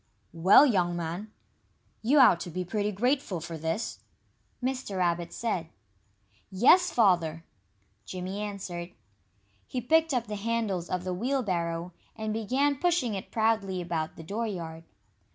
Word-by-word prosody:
"Well, 185 Hz, -, +7 dB
young 180 Hz, -9 st, +2 dB
man, 175 Hz, +5 st, -4 dB, 0.7 s
you 260 Hz, +7 st, +3 dB
ought 250 Hz, -11 st, +7 dB
to 175 Hz, -, -6 dB
be 180 Hz, +2 st, -4 dB
pretty 210 Hz, +2 st, -1 dB
grateful 245 Hz, -2 st, 0 dB
for 165 Hz, +1 st, -6 dB
this," 165 Hz, +7 st, -3 dB, 0.6 s
Mr. 255 Hz, -6 st, -2 dB
Rabbit 170 Hz, -1 st, 0 dB
said. 190 Hz, -8 st, -2 dB, 0.8 s
"Yes, 270 Hz, -, +5 dB
Father!" 170 Hz, -7 st, +2 dB, 0.6 s
Jimmy 185 Hz, +2 st, -5 dB
answered. 185 Hz, -4 st, -5 dB, 0.7 s
He 255 Hz, -, -3 dB
picked 320 Hz, +6 st, +3 dB
up 245 Hz, -3 st, 0 dB
the 210 Hz, 0 st, -5 dB
handles 205 Hz, -5 st, -1 dB
of 180 Hz, -1 st, -2 dB
the 185 Hz, 0 st, -2 dB
wheelbarrow, 180 Hz, -7 st, -1 dB, 0.2 s
and 220 Hz, -1 st, -3 dB
began 265 Hz, +6 st, +1 dB
pushing 335 Hz, -7 st, +1 dB
it 195 Hz, -, -5 dB
proudly 220 Hz, -4 st, +1 dB
about 165 Hz, -3 st, -3 dB
the 165 Hz, -, -10 dB
dooryard. 170 Hz, -5 st, -4 dB
195 Hz, 135 wpm, -28 LUFS, 175-230 Hz, 0.8 s, Well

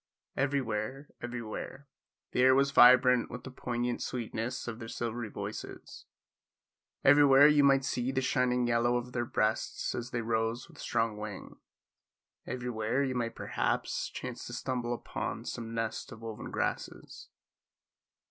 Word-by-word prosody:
Everywhere, 135 Hz, -1 st, -2 dB
everywhere, 120 Hz, +3 st, -6 dB, 0.4 s
the 125 Hz, -, +1 dB
air 130 Hz, +1 st, +6 dB
was 140 Hz, +1 st, +3 dB
vibrant 125 Hz, -1 st, +7 dB
with 125 Hz, +1 st, -7 dB
the 130 Hz, -, -8 dB
poignant 120 Hz, -1 st, -2 dB
sweetness 120 Hz, +1 st, -3 dB
of 115 Hz, -1 st, -5 dB
their 115 Hz, -, -7 dB
silvery 115 Hz, 0 st, -4 dB
voices; -, -, -7 dB, 1.0 s
everywhere 140 Hz, 0 st, +7 dB
you 150 Hz, -1 st, +5 dB
might 135 Hz, -1 st, +4 dB
see 130 Hz, -2 st, -1 dB
the 130 Hz, -, 0 dB
shining 125 Hz, -1 st, +1 dB
yellow 120 Hz, +1 st, +2 dB
of 120 Hz, 0 st, -5 dB
their 120 Hz, -1 st, -1 dB
breasts 110 Hz, -1 st, -1 dB
as 120 Hz, +1 st, -4 dB
they 120 Hz, -, -2 dB
rose 115 Hz, +1 st, -1 dB
with -, -, -17 dB
strong 110 Hz, -2 st, -1 dB
wing; 105 Hz, -2 st, -7 dB, 0.9 s
everywhere 125 Hz, +1 st, -1 dB
you 130 Hz, -2 st, -1 dB
might 120 Hz, -2 st, -2 dB
perhaps -, -, -1 dB
chance -, -, -6 dB
to -, -, -7 dB
stumble 120 Hz, -2 st, -2 dB
upon -, -, -5 dB
some 115 Hz, -1 st, -5 dB
nest 115 Hz, -1 st, -3 dB
of 110 Hz, -, -10 dB
woven 110 Hz, -2 st, -6 dB
grasses. -, -, -4 dB
120 Hz, 140 wpm, -31 LUFS, 115-130 Hz, 1.0 s, vibrant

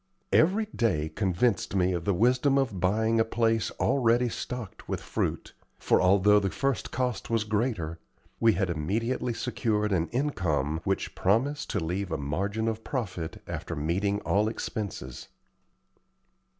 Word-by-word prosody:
Every 195 Hz, +7 st, +4 dB
day 80 Hz, -10 st, +1 dB
convinced 100 Hz, +2 st, 0 dB
me 90 Hz, -1 st, +2 dB
of 85 Hz, -2 st, -3 dB
the 100 Hz, -, +2 dB
wisdom 130 Hz, +6 st, +3 dB
of 120 Hz, -9 st, 0 dB
buying 110 Hz, +5 st, +2 dB
a -, -, +5 dB
place 115 Hz, 0 st, +1 dB
already 120 Hz, -2 st, +3 dB
stocked 120 Hz, -2 st, -6 dB
with -, -, -1 dB
fruit; -, -, -3 dB, 0.2 s
for, -, -, +2 dB
although 100 Hz, +2 st, +5 dB
the 100 Hz, -1 st, -1 dB
first 135 Hz, +4 st, -1 dB
cost 125 Hz, -2 st, -2 dB
was 115 Hz, -2 st, +1 dB
greater, 105 Hz, -7 st, -1 dB, 0.4 s
we 115 Hz, -1 st, +5 dB
had 95 Hz, -1 st, 0 dB
immediately 115 Hz, +10 st, -1 dB
secured 110 Hz, -4 st, -1 dB
an 85 Hz, -3 st, +1 dB
income 85 Hz, -, -1 dB
which 95 Hz, 0 st, -1 dB
promised 135 Hz, -, +1 dB
to 105 Hz, -, 0 dB
leave 90 Hz, +3 st, -2 dB
a -, -, 0 dB
margin 100 Hz, +10 st, -2 dB
of 110 Hz, 0 st, -2 dB
profit 95 Hz, -, -4 dB
after -, -, -5 dB
meeting 95 Hz, +7 st, 0 dB
all 105 Hz, +2 st, +2 dB
expenses. 100 Hz, -, -5 dB
105 Hz, 145 wpm, -28 LUFS, 90-120 Hz, 0.4 s, a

